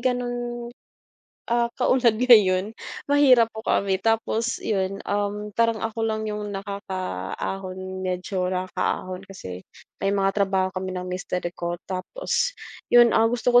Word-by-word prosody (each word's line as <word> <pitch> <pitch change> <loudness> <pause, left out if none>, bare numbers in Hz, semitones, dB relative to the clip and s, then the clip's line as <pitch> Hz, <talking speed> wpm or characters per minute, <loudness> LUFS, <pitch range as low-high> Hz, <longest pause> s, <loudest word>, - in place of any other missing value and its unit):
ganun, 245 -1 -2 0.8
ah, 235 0 +2
katulad 250 -3 +4
ngayon. 210 -4 +5 0.4
Mahirap 265 -5 +6
po 220 - -6
kami 195 -1 +2
tapos 225 +1 +1
yun, 195 -2 -1
um, 205 +1 -2
parang 230 -1 +3
ako 225 0 -3
lang 220 0 -2
yung 210 0 -4
nakakaahon, 190 - -5
medyo 180 0 -2
nakakaahon 185 0 -2
kasi 95 - -8 0.4
may 195 - +2
mga 195 -1 +2
trabaho 190 -1 +1
kami 185 0 -3
ng 180 0 -4
mister 180 0 -3 0.2
ko 175 0 -3
tapos 480 - -1 0.4
yun, 240 -1 +7
ah, 225 - +5
gusto 245 +1 +1
ko 245 - +9
205 Hz, 130 wpm, -24 LUFS, 185-235 Hz, 0.8 s, ko